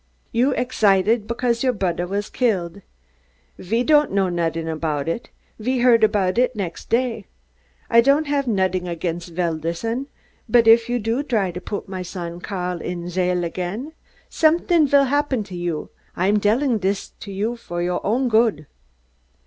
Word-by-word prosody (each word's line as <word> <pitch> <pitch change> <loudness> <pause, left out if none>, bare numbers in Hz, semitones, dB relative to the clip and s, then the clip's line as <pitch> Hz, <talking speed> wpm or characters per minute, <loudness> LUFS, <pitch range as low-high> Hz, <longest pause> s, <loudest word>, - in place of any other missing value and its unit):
You're 250 +4 +2
egsited, 215 -3 +2
because 235 0 -1
your 255 -1 +2
brodder 180 -4 -1
vas 200 +2 -2
gilled. 200 -7 -1 0.8
Ve 225 +6 0
don't 300 0 +4
know 195 -1 +1
nodding 165 -1 -2
aboud 155 -2 -2
it. 165 +8 -3 0.3
Ve 255 +4 -1
heard 240 -2 +4
aboud 205 -1 +2
it 250 0 +2
de - - -12
nexd 175 -4 -5
day. 230 -3 0 0.6
I 235 -1 +6
don'd 280 +5 +3
have 285 -2 -1
nodding 185 -4 0
against 170 0 -4
Velderson, 170 - -2 0.4
bud 230 0 +4
if 230 +1 +6
you 245 - +1
dry 225 -3 0
to 180 +1 -7
pud 205 +2 -5
my 190 -1 -5
son, 175 -1 -6
Karl, 180 -3 -4
in 175 -1 -4
chail 180 0 0
again, 185 - -4 0.3
someding 330 0 +3
vill 280 0 +5
happen 275 -3 0
to 190 -2 -10
you. 175 -3 -4 0.2
I'm 200 +4 +2
delling 225 +3 +2
dis 195 +1 -1
to 200 - -8
you 210 +5 -2
vor 175 -7 -5
your 180 0 -2
own 250 +5 +1
good." 220 -9 +2
205 Hz, 160 wpm, -22 LUFS, 180-245 Hz, 0.8 s, I